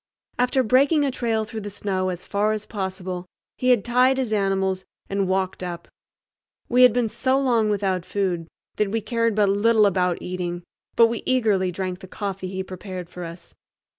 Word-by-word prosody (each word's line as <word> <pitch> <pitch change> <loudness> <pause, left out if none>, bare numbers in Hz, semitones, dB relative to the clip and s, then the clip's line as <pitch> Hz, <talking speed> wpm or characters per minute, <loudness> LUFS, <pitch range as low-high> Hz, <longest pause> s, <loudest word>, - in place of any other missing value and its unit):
After 250 +1 +3
breaking 280 +6 +4
a 275 - 0
trail 225 -3 -1
through 220 0 -6
the 205 - -5
snow 190 -2 -2
as 180 -1 -5
far 210 +1 +1
as 215 -1 -4
possible 185 -3 -5 0.3
he 255 - +1
had 240 -6 +4
tied 250 +2 +4
his 250 -5 -1
animals 190 -2 0 0.2
and 195 -1 -1
walked 190 0 -1
up. 175 -2 -5 0.8
We 250 +1 +3
had 250 -1 +9
been 240 0 +1
so 260 +4 +1
long 235 -5 +2
without 195 -3 0
food 180 -4 -2 0.3
that 210 -2 +1
we 225 +3 0
cared 230 -1 0
but 210 -1 +3
little 210 +2 +4
about 180 -3 +2
eating, 175 -1 -4 0.3
but 230 - +7
we 230 -1 -1
eagerly 215 -8 +2
drank 185 0 -4
the 190 - -11
coffee 195 -1 -4
he 190 0 -4
prepared 185 -1 -7
for 180 - -7
us. 170 +1 -10
200 Hz, 185 wpm, -23 LUFS, 185-230 Hz, 0.8 s, had